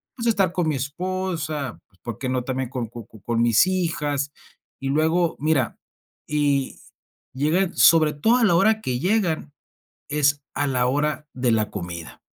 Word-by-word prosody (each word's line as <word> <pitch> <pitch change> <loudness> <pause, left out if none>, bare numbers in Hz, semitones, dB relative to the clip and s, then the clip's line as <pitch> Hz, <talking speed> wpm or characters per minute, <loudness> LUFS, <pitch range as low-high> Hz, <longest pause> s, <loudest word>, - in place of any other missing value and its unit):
pues 235 -2 -3
estar 195 -6 +2
con 175 -3 0
mi 150 - 0
esposa, 155 - -3
pues 95 - -31
por 120 -3 -5
qué 130 - -3
no 125 -1 -1
también 130 0 -2
co 125 -5 -4
co 120 -2 -9
co 110 - -17
con 115 -1 -1
mis 120 +6 +5
hijas. 150 -6 -1 0.5
Y 135 - -3
luego, 160 +3 +1
mira, 145 -6 0 0.5
y 145 -3 0 0.5
llegan, 165 +7 +1
sobre 160 -2 +6
todo 225 +12 +3
a 245 - +2
la 175 -4 +4
hora 220 +4 +3
que 125 - -2
llegan 175 -7 0 0.6
es 145 -1 +1
a 145 - 0
la 125 -2 +1
hora 150 +3 -1
de 125 -2 +1
la 110 -1 +1
comida. 85 -2 -7
145 Hz, 170 wpm, -23 LUFS, 130-170 Hz, 0.6 s, sobre